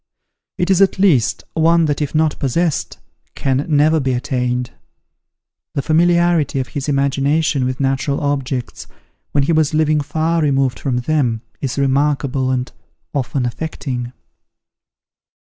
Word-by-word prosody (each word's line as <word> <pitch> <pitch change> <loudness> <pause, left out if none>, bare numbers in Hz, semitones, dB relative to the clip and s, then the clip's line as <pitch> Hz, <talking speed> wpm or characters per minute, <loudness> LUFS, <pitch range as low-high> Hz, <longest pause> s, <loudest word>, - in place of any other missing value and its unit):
It 180 +2 +1
is 190 0 +3
at 195 - +3
least, 175 - +2
one 165 +1 +3
that 145 -1 -1
if 150 +1 -3
not 155 -1 +1
possessed, 155 +4 -1 0.4
can 135 +1 -1
never 155 +1 +3
be 130 -2 0
attained. 125 0 -2 1.0
The 140 - -1
familiarity 170 -2 +2
of 130 -2 -3
his 140 +2 -4
imagination 140 +1 +1
with 130 +1 -3
natural 135 +1 0
objects, 135 -3 -3 0.4
when 145 - +2
he 165 - +1
was 155 -1 +2
living 155 -1 +2
far 160 +3 0
removed 135 -3 +1
from 125 -3 -1
them, 125 -6 0 0.2
is 135 -1 -3
remarkable, 135 -1 +1
and 130 -1 -1 0.4
often 135 -1 -1
affecting. 125 -2 -4
140 Hz, 130 wpm, -18 LUFS, 130-155 Hz, 1.0 s, is